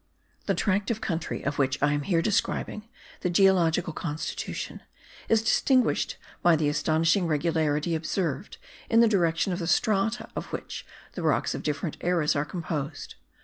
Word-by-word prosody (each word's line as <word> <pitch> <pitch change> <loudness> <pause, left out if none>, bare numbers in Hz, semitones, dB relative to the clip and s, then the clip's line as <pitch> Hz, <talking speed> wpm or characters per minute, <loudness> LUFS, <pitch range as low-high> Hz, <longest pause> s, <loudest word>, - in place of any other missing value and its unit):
The - - +2
tract 200 0 0
of 225 -2 -1
country 175 -7 -3
of 140 +1 -2
which 135 -1 +2
I 145 +1 +2
am 145 - 0
here 165 +2 +1
describing 215 +1 -1 0.3
the 180 - -1
geological 175 -3 +3
constitution 160 -2 -4 0.5
is 220 -1 +3
distinguished 255 +3 +2 0.2
by 175 -1 +5
the 150 -2 +1
astonishing 160 +4 +2
regularity 155 0 +1
observed 165 +2 -2 0.3
in 230 0 +5
the 235 - +6
direction 180 -3 +1
of 175 - -3
the 170 - -3
strata 215 +4 +1
of - - -4
which - - -6 0.3
the - - -5
rocks - - +1
of - - -4
different 150 +2 -3
eras 170 -4 +1
are 145 +1 0
composed. 155 -3 -4
170 Hz, 155 wpm, -27 LUFS, 155-195 Hz, 0.5 s, the